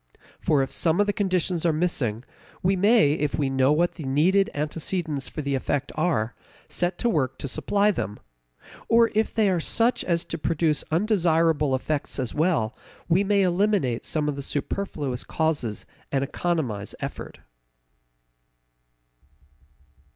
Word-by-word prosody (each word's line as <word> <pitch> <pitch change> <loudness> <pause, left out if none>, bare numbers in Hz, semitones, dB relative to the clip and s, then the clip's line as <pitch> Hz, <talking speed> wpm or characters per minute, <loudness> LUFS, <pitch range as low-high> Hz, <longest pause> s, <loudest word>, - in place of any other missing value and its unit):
For 145 -3 +2
if 135 - -5
some 165 +1 +1
of 205 - +4
the 205 - 0
conditions 185 -4 0
are 170 - +3
missing, 145 -9 -1 0.4
we 190 +2 +3
may, 200 -5 +4
if 150 -2 -1
we 140 -3 0
know 135 +1 +3
what 170 +3 +2
the 160 - -9
needed 170 +9 +3
antecedents 155 -1 -2
for 155 - -5
an 140 - -4
effect 135 +1 -1
are, 150 -9 0 0.3
set 175 0 -1
to 240 - 0
work 135 - 0
to - - -5
supply 205 +9 +1
them; 105 - -4 0.7
or, 230 0 +5
if 220 +1 +1
they 220 -2 +2
are 185 -3 +2
such 230 +8 +1
as 170 -2 0
to 165 - -5
produce 155 -1 0
undesirable 165 -6 +2
effects 145 +2 -2
as 130 -4 -2
well, 155 -9 +1 0.3
we 180 +3 +3
may 200 0 +3
eliminate 180 - +1
some 150 -2 -1
of 150 - -1
the 140 - -5
superfluous 145 -3 -3
causes 150 -9 -2 0.3
and 135 -1 +1
economize 140 - -2
effort. - - -6
160 Hz, 150 wpm, -25 LUFS, 140-185 Hz, 0.7 s, or